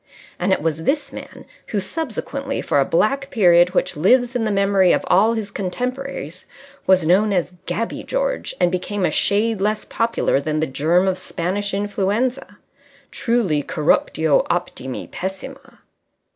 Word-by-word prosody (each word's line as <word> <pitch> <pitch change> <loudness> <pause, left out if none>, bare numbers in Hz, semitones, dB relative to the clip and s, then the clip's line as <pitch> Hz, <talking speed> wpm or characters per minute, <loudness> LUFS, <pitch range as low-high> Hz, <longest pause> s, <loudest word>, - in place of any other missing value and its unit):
And - - 0
it - - +1
was 160 0 -2
this 290 +1 0
man - - -10 0.2
who 210 - -1
subsequently, 275 - -4
for 145 - +1
a 135 - +3
black 275 +10 +1
period 180 -7 +4
which - - +1
lives 245 +10 +3
in 235 -2 0
the - - 0
memory 195 -2 +3
of - - 0
all 215 +5 +4
his 210 -3 -4
contemporaries, 245 - -4 0.4
was 185 -3 +4
known 195 +6 +3
as 180 -1 0
Gabby 230 +1 -2
George - - -2
and 175 -1 +3
became 185 +1 -2
a - - +1
shade 210 0 +1
less 215 +1 0
popular 230 -10 0
than 155 +1 -2
the 160 - +1
germ 160 +7 +1
of 185 -1 0
Spanish 185 +3 -3
Influenza. 205 +6 -1 0.5
Truly, 225 - 0
_corruptio 155 +1 +1
optimi 170 -7 -3
pessima! 195 +9 -7
195 Hz, 150 wpm, -21 LUFS, 175-230 Hz, 0.5 s, period